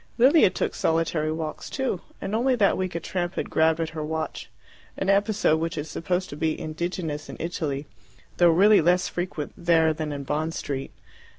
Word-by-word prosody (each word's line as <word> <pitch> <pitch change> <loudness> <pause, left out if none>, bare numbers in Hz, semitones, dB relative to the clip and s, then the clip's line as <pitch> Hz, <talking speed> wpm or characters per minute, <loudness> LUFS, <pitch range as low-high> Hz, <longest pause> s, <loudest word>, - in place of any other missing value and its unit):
Lilia 265 - +6
took - - -2
solitary 160 -1 0
walks 155 -1 -5
too, 260 -10 -2 0.2
and 195 - -4
only 250 +4 +2
that 210 -5 +3
week 185 -2 -3
a - - 0
tramp 175 +1 -3
had - - -3
grabbed 160 0 +3
at 165 -1 -1
her 155 -1 -5
watch 160 +1 -4 0.5
an 190 - -1
episode 200 -5 +2
which 165 0 -3
is 150 +1 -4
supposed 180 +2 -1
to - - -6
be 155 +1 -1
indigenous 155 -1 -4
in - - -8
Italy, 155 -4 -3 0.5
though 175 -1 +6
really 200 +5 +6
less 180 +3 +3
frequent 175 -4 -4
there 165 -2 +3
than 155 -1 -4
in 140 -1 -4
Bond 155 +4 -2
Street. 135 -1 -4
165 Hz, 185 wpm, -25 LUFS, 155-185 Hz, 0.5 s, Lilia